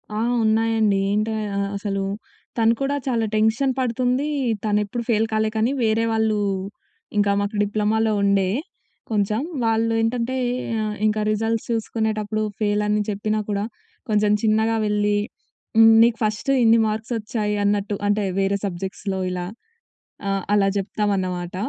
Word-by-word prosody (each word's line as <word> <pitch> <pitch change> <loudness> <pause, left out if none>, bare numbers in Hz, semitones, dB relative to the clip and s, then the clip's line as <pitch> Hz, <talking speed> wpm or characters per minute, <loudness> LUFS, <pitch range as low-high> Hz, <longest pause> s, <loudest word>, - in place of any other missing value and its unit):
ఆ! - - -2 0.3
ఉన్నాయండి. 220 -2 +2
ఏంటయ 215 +1 0 0.4
అసలు, 195 -1 -2 0.5
తను 225 0 +4
కూడా 280 +1 0
చాలా 235 -3 +1
టెన్షన్ 220 +5 +2
పడుతుంది. 255 +3 0 0.4
తనెప్పుడు 210 +2 0
ఫెయిల్ 220 -1 +3
కాలే 220 0 +1
కానీ, 225 +4 +2
వేరే 225 +1 +2
వాళ్ళు 220 -1 +1 0.8
ఇంకా 205 -1 +3
మాకు 205 +1 -3
డిప్లొమాలో 215 +2 +1
ఉండే 200 -1 +2 0.6
కొంచెం. 210 +2 +1 0.2
వాళ్ళు 225 0 +1
ఏంటంటే, 240 +3 -1 0.7
ఇంక 215 0 0
రిజల్ట్స్ 225 +1 -1
చూసుకునేటప్పుడు 215 -1 -1 0.2
ఫేలని 210 0 +1
చెప్పినా 215 +1 -1
కూడా, 205 0 -1 0.4
కొంచెం 210 -1 +2
చిన్నగా 220 +1 +2
వెళ్ళి, 210 0 +1 0.6
హ్మ్, 225 0 +8
నీకు 230 -1 +3
ఫస్ట్ 215 +6 0
ఇన్ని 230 0 +5
మార్క్స్ 220 +3 -3
వచ్చాయి 210 -1 -2
అన్నట్టు. 205 0 0
అంటే, 205 0 +1 0.2
వేరే 195 +1 +1
సబ్జెక్ట్స్‌లో 190 +1 -4
ఇలా. 180 -1 -3 0.8
ఆహ్, 195 -1 -1
అలా 200 -1 +4
చెప్తామన్నమాట. 190 -3 -2
215 Hz, 125 wpm, -22 LUFS, 205-225 Hz, 0.8 s, హ్మ్